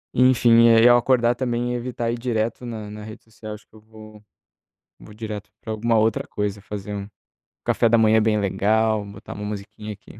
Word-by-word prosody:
Enfim, 120 -2 +5
e 115 +1 +6
ao 120 0 +7
acordar 120 -1 +2
também 120 -1 -2
evitar 120 -1 -3
ir 120 - -4
direto 115 0 -2
na 110 -3 -6
na 105 0 -9
rede 110 +1 -10
social. 110 -1 -10
Acho 105 - -17
que - - -49
eu 110 - -16
vou 110 -1 -15 0.8
vou 105 - -14
direto 105 -2 -7
pra 110 - -5
alguma 115 +1 0
outra 110 0 +1
coisa. 105 0 -3
Fazer 105 0 -7
um 100 0 -6 0.6
café 115 - +2
da 115 +1 +4
manhã 110 0 +4
bem 105 -1 +2
legal, 105 +2 +1
botar 100 0 -10
uma 105 0 -7
musiquinha 105 +1 -7
aqui 105 +2 -16
110 Hz, 195 wpm, -22 LUFS, 105-115 Hz, 0.8 s, ao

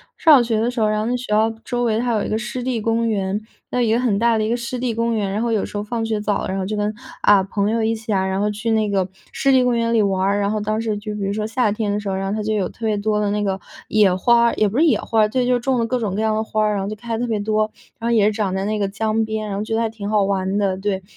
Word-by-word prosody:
上 320 - +5
小 250 - +4
学 225 -2 0
的 240 +2 +1
时 245 - -4
候， 215 - +3
然 215 0 0
后 - - -2
那 245 +2 0
学 250 - -7
校 220 +1 +3
周 245 -1 -1
围 225 -2 +1
它 240 -1 0
有 210 - 0
一 - - -4
个 215 - 0
湿 240 +2 -4
地 250 -2 -1
公 230 +1 0
园， 200 0 -1 0.3
那 250 - 0
有 230 - +2
一 - - +2
个 235 - +2
很 230 -6 +1
大 230 0 +3
的 215 - 0
一 - - -1
个 230 - +1
湿 240 +1 -4
地 245 -1 -1
公 230 +1 0
园。 205 -3 -1
然 210 - -1
后 235 - 0
有 220 -3 +1
时 - - -11
候 205 - -1
放 225 +1 -3
学 220 -2 -1
早 205 -1 -1
了， - - -3
然 190 - -2
后 190 - -2
就 210 +2 -3
跟， 210 +1 -1 0.3
啊， 200 -2 +6
朋 200 +1 -1
友 225 0 0
一 225 +1 +1
起 225 -1 -4
啊， 190 -1 +1
然 190 0 -1
后 210 +1 +1
去 215 +2 -2
那 215 -1 +2
个 195 -2 +1 0.3
湿 275 - +2
地 260 -1 +4
公 245 -1 +2
园 230 0 +1
里 225 - +4
玩 195 -2 +1
儿。 200 +1 +2
然 200 0 0
后 215 0 -1
当 215 +1 -1
时 220 -2 -1
就 210 0 -5
比 210 - -5
如 195 +1 -1
说 210 0 -2
夏 225 -2 +1
天 210 -1 -1
的 205 - 0
时 210 - -7
候， 195 - -1
然 190 0 -2
后 195 - -2
它 215 - -2
就 215 +1 -1
有 200 -3 0
特 225 - -8
别 215 -1 +1
多 210 +1 0
的 205 -1 0
那 210 0 0
个 195 -1 -1 0.3
野 205 -4 +4
花 235 +5 +4
儿， 235 - +2
也 215 - +2
不 225 - -4
是 325 - +5
野 245 -10 +4
花 225 - 0
儿， 210 - +4
对， 250 +3 0
就 250 - +2
是 - - 0
种 255 +1 0
了 230 - +1
各 250 +1 -1
种 205 -4 -2
各 210 - -1
样 220 0 +1
的 215 - 0
花 215 -1 -1
儿， 210 - +2
然 195 - -1
后 195 - -3
就 215 - -4
开 230 +1 -4
得 - - -5
特 245 - -1
别 220 - 0
多， 215 +1 +1 0.3
然 230 - -2
后 235 - +3
也 215 - +4
是 215 - +3
长 205 -3 -1
在 190 - -1
那 215 +1 -1
个 200 - +1
江 220 +2 -1
边， 220 -1 -3
然 195 - -3
后 205 - -2
觉 225 - -2
得 230 - +1
还 225 - 0
挺 210 -2 -6
好 210 -1 +3
玩 195 0 0
的， 195 -2 0
对。 195 -1 -2
215 Hz, 390 characters per minute, -21 LUFS, 205-230 Hz, 0.3 s, 啊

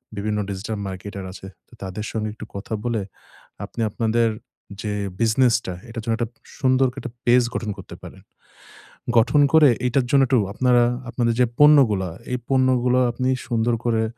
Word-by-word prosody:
বিভিন্ন 105 +1 -2
digital 105 +3 -4
marketer 95 +1 -7
আছে। 95 0 -10 0.2
তো - - -24
তাদের 95 +3 -5
সঙ্গে 110 -1 -2
একটু 110 - -9
কথা 100 +3 -6
বলে, 115 -3 0 0.6
আপনি 115 - -7
আপনাদের 115 +1 +1 0.5
যে 105 -1 -3 0.3
বিজনেসটা, 115 -3 +2 0.2
এটার 115 0 -6
জন্য 115 0 0
একটা 120 -2 -2 0.3
সুন্দর 130 -1 +3
করে 135 - -9
একটা 120 - -7
পেজ 120 +1 +5
গঠন 110 - -3
করতে - - -10
পারেন। - - -11 1.0
গঠন 145 +6 +4
করে, 155 -3 +7 0.2
এইটার 125 +1 +1
জন্য 140 - +5
একটু 130 -1 +3
আপনারা, 125 +1 +3 0.3
আপনাদের 120 -1 0
যে - - +6
পণ্যগুলা, 130 -11 +5 0.2
এই 125 - 0
পণ্যগুলা 130 -1 +3
আপনি 130 +2 -2 0.2
সুন্দর 120 -1 +1
করে 115 -2 +1
120 Hz, 160 wpm, -22 LUFS, 110-125 Hz, 1.0 s, করে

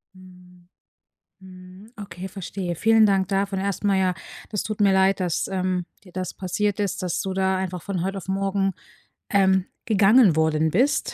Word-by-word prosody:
Mhm. 180 -1 -18 0.7
Mhm. 185 +3 -14
Okay, 190 -2 -7
verstehe. 185 -2 -5
Vielen 225 +3 +4
Dank 195 -2 +2
dafür 195 0 -1
erstmal. 200 0 0
Ja, 185 -1 +1 0.4
das 210 - -2
tut 215 -1 -5
mir 200 -2 +4
leid, 190 +1 +3
dass, 175 -3 -1
ähm, 185 -1 -1 0.2
dir 180 - -16
das 185 0 -4
passiert 205 +2 -2
ist, 195 -1 -2
dass 175 -1 -1
du 190 -1 -3
da 190 0 +1
einfach 185 -2 -4
von 185 -3 -3
heute 195 +1 -3
auf 190 - -8
morgen, 195 0 0 0.6
ähm, 190 -1 +3 0.2
gegangen 210 -3 +5
worden 160 0 +1
bist, 255 +10 +1
190 Hz, 165 wpm, -23 LUFS, 180-200 Hz, 0.7 s, gegangen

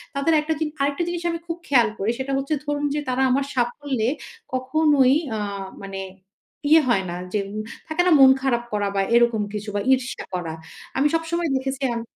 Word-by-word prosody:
তাদের 280 +4 +2
একটা 320 +1 -1
জিন 315 -1 -1
আরেকটা 285 +5 +1
জিনিস 345 0 -4
আমি 335 - -3
খুব 335 0 -3
খেয়াল 240 -5 +5
করি, 205 +4 +1
সেটা 270 +1 -3
হচ্ছে 275 +3 -1
ধরুন 290 0 -1
যে - - 0
তারা 255 +1 0
আমার 275 +1 +2
সাফল্যে 245 -1 0 0.4
কখনোই 270 0 +3 0.2
আ - - -3 0.4
মানে 195 0 -5 0.7
ইয়ে 320 +1 +7
হয় 195 -5 +3
না - - -4 0.2
যে 210 - +2
উম 215 - -4 0.3
থাকে 315 +2 +1
না 360 - +4
মন 265 -1 +9
খারাপ 240 -3 +1
করা 205 -1 0
বা 195 - +2
এরকম 235 -2 +4
কিছু 210 0 -4
বা 205 - +1
ঈর্ষা 260 0 -2
করা। 170 -3 -3 0.4
আমি 280 - +4
সবসময় 330 0 -1
দেখেছি 270 +1 -3
আম 235 - -2
265 Hz, 190 wpm, -23 LUFS, 235-300 Hz, 0.7 s, মন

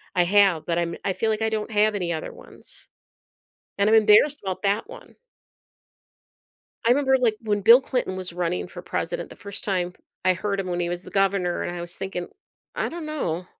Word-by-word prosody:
I 180 - +4
have, 195 -3 +4
but 170 -1 -1
I'm 170 0 -2
I 190 - +1
feel 225 - -1
like 215 - -2
I 220 - +2
don't 220 0 -3
have 210 0 +3
any 175 -4 -1
other 160 - -5
ones, - - -8 0.9
and 200 +1 +3
I'm 225 - +6
embarrassed 220 +7 +5
about 190 0 -3
that 200 - 0
one. - - -12 1.7
I - - +4
remember, 265 0 +4
like, 230 -4 +1
when 210 -2 -1
Bill 230 +6 +8
Clinton 250 -8 -2
was 185 -2 -5
running 180 0 -2
for 180 0 -9
president, 175 -1 -3
the - - -12
first 200 0 -8
time 180 -3 -1 0.3
I 185 - +5
heard 200 +2 -2
him 190 - -3
when 175 -1 -2
he 175 -1 -1
was 175 +1 -3
the - - -11
governor, 195 -2 +1
and 175 - -4
I 175 - -5
was 175 0 -5
thinking, 190 -2 -4 0.5
"I - - -1
don't 335 -2 -6
know," 185 - -3
195 Hz, 205 wpm, -24 LUFS, 175-220 Hz, 1.7 s, Bill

